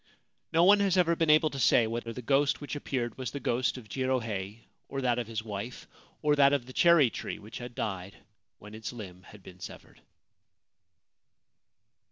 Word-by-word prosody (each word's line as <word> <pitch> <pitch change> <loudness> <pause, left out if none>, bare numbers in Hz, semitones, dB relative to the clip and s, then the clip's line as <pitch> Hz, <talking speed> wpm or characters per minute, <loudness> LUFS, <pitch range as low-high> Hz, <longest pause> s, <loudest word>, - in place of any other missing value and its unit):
No 165 +1 +4
one 200 +3 +7
has 195 -2 +2
ever 170 -2 +3
been 165 -1 0
able 155 0 +5
to 135 - -5
say 120 -2 +5
whether 115 +1 -4
the 125 +2 -7
ghost 140 +3 +2
which 145 0 -6
appeared 125 -5 -3
was 130 - -3
the 140 - -6
ghost 125 0 0
of 120 -4 -11
Jirohei, 115 -4 -2 0.3
or 135 - -3
that 125 -2 +1
of 120 - -4
his 110 -1 -4
wife, 110 +3 -6 0.4
or 150 0 +4
that 140 0 +6
of 140 -4 0
the 130 - -11
cherry 170 -7 +5
tree - - -5
which 105 +2 -10
had 120 -1 -8
died 95 -2 -4 0.4
when 105 +3 -13
its 110 0 -6
limb 95 -7 -9
had 100 +2 -15
been 90 0 -13
severed. - - -11
125 Hz, 190 wpm, -29 LUFS, 110-145 Hz, 0.4 s, one